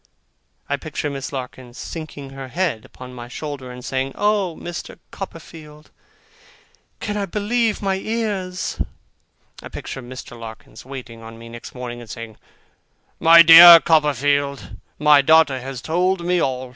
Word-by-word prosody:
I - - -1
picture 145 - -5
Miss 135 -1 -6
Larkins 125 -2 -8
sinking 150 -4 -8
her 135 -1 -8
head 145 -6 -2
upon 125 0 -12
my 120 -1 -9
shoulder, 140 0 -7
and 125 0 -10
saying, 135 0 -2
'Oh, 205 -5 0
Mr. 175 0 -7
Copperfield, 155 -4 -10 1.1
can 210 - -4
I 200 -1 -2
believe 215 +3 -1
my 195 -1 0
ears!' 200 -4 -3 0.8
I - - -10
picture 135 - -7
Mr. 125 -1 -10
Larkins 110 0 -11
waiting 125 -3 -10
on 115 0 -11
me 115 0 -12
next 120 +2 -11
morning, 120 -1 -7
and 115 - -13
saying, 115 -1 -9 0.8
'My 170 0 +8
dear 170 +1 +11
Copperfield, 145 -3 0 0.2
my 150 -1 +5
daughter 150 -2 +4
has 130 0 -7
told 180 +2 0
me 180 0 +1
all. 130 -1 -2
145 Hz, 145 wpm, -21 LUFS, 125-175 Hz, 1.1 s, dear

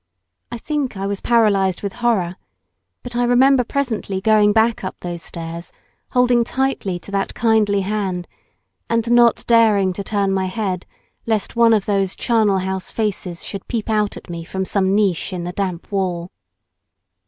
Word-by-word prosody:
I 240 - -4
think 280 -3 -3
I 195 - -3
was 200 0 -3
paralysed 200 -6 +2
with 200 -1 -3
horror, 195 -7 +1 0.7
but 245 - -7
I 245 - +2
remember 250 +2 +4
presently 235 -7 -2
going 210 +1 +4
back 225 +1 +2
up 185 - -4
those 175 -1 -5
stairs, 170 0 -7 0.4
holding 250 -2 +4
tightly 260 -7 -1
to 175 - -12
that 195 -1 -2
kindly 215 -3 +2
hand, 190 -3 -2 0.6
and 230 0 0
not 240 -1 +4
daring 215 -5 +4
to 200 - -5
turn 200 -1 0
my 190 -1 0
head 185 -2 -3 0.4
lest 220 -1 0
one 230 -1 +5
of 210 -3 +2
those 195 -2 0
charnel 220 -4 +2
house 190 0 -3
faces 195 -5 -3
should 200 -2 -6
peep 225 -2 -2
out 210 -1 0
at - - -12
me 170 -2 -6
from 190 +3 -4
some 190 0 +1
niche 195 -3 +1
in 175 -1 -4
the 175 +1 -5
damp 185 -2 -4
wall. 180 -3 -2
200 Hz, 165 wpm, -20 LUFS, 190-230 Hz, 0.7 s, one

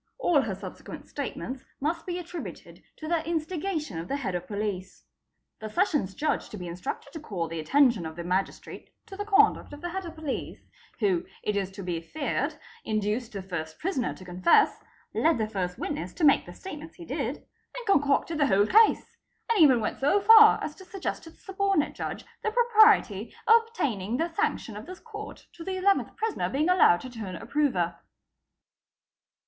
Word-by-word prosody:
All 350 - +3
her 215 -6 -3
subsequent 195 - -9
statements 260 0 -5 0.2
must 330 +5 -2
be 355 -1 -2
attributed 350 -1 -8
to 310 - -8
the 335 -1 +1
instigation 320 - -2
of 165 - -6
the 275 - -1
Head 230 -10 -3
of 180 0 -4
Police. 205 -3 -4 0.6
The 220 - -6
Sessions 295 - 0
Judge 305 +1 -1
to 210 - -8
be 180 - -7
instructed 180 +10 -6
to 320 - -6
call 190 - -4
the 165 0 -5
attention 235 - +3
of 160 - -9
the 170 - -6
Magistrate 185 +3 -3 0.2
to 390 - -10
the 410 +1 -4
conduct 420 -5 +3
of 290 - -10
the 350 - -3
Head 380 0 -4
of 330 - -9
Police, 315 -4 -5 0.4
who, 185 -5 +2 0.2
it 210 - -1
is 195 -2 -1
to 195 - -7
be 175 -2 -3
feared, 285 - -2 0.3
induced 215 +2 -1
the 195 -2 -6
Ist 160 0 -12
prisoner 310 -9 -1
to 185 - -13
confess, 180 0 +3 0.3
led 325 0 +3
the 220 - 0
1st 185 -4 -3
witness 175 +3 -4
to 340 - -4
make 280 -10 +5
the 175 - -9
state 375 -6 -8
ments 315 +2 -11
he 345 - -10
did,—and - - -6
concocted 305 -3 +2
the 290 - +4
whole 200 -3 +4
case; 435 - +4 0.3
and 450 - +3
even 265 -6 +7
went 220 - -3
so 290 +9 +3
far 440 +1 +8
as 300 - -4
to 380 - -12
suggest 375 -1 -5
to - - -10
the - - -20
Subordinate 390 -4 0
Judge - - -5 0.2
the - - 0
propriety 430 - +4
of 455 +1 +7
obtaining 235 - -2
the 330 +2 -1
sanction 410 - -1
of 210 +8 -8
this 370 0 -9
Court 430 -2 -9
to 335 - -9
the 380 - -3
11th 395 +1 +2
prisoner 445 -1 -1
being 300 +5 0
allowed 350 - +5
to 255 - -7
turn 210 -6 -6
approver." 205 - 0
285 Hz, 190 wpm, -27 LUFS, -, 0.6 s, far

